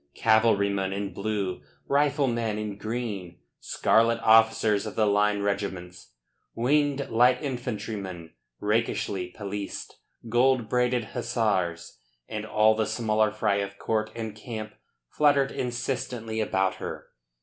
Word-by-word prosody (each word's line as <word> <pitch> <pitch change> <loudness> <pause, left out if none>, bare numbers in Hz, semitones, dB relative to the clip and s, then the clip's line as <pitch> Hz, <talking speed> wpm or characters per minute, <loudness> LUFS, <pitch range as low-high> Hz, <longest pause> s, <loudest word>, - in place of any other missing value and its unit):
Cavalrymen 100 -4 +3
in 100 -1 -4
blue, 100 -5 -2 0.3
riflemen 135 -6 +1
in 105 -1 -4
green, 105 -5 -5 0.2
scarlet 115 +1 +2
officers 110 -1 +4
of 105 - -7
the 110 - +3
line 105 0 +2
regiments, 95 -3 -4 0.4
winged 140 +3 +1
light 125 +2 +4
infantrymen, 105 - -5 0.3
rakishly 105 -3 -1
pelissed, 100 -1 -6 0.3
gold 120 0 +3
braided 125 -1 +1
hussars 110 -8 -1 0.3
and - - -5
all 110 +1 +4
the 110 0 0
smaller 110 -2 +1
fry 105 -1 0
of 100 0 -4
court 110 0 -1
and 110 -2 -5
camp 110 -1 -7 0.3
fluttered 140 - +3
insistently 120 -2 -3
about 95 -3 0
her. - - -7
110 Hz, 115 wpm, -27 LUFS, 100-120 Hz, 0.4 s, officers